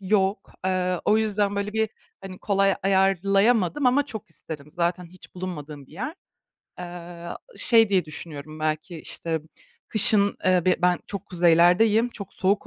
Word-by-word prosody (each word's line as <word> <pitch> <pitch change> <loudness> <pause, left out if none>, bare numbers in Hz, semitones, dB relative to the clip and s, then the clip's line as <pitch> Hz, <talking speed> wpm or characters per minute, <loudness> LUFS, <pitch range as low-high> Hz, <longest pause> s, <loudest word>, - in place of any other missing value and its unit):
yok. 195 0 0
Eee, 185 -1 -1
o 215 +1 +3
yüzden 205 -2 0
böyle 200 +1 -3
bir, 220 0 0 0.3
hani, 190 -1 -10
kolay 195 -2 +1
ayarlayamadım 195 - +2
ama 275 +3 +3
çok 220 - -8
isterim. 150 -3 -10
Zaten 175 +2 -2
hiç 185 +2 -17
bulunmadığım 150 -6 -7
bir - - -21
yer. 255 - -5 0.6
Eee, 175 -1 -9 0.3
şey 225 -3 +5
diye 190 -4 +1
düşünüyorum 155 0 -8
belki, 155 +2 -3
işte, 165 +1 -1
ımm, 155 - -6 0.5
kışın, 205 -1 +5
eee 185 -2 +3
bi 185 -1 +3
ben 180 0 +3
çok 200 -1 -7
kuzeylerdeyim, 180 +7 +3
çok 200 -5 -10
soğuk 195 +2 0
185 Hz, 150 wpm, -24 LUFS, 170-205 Hz, 0.6 s, şey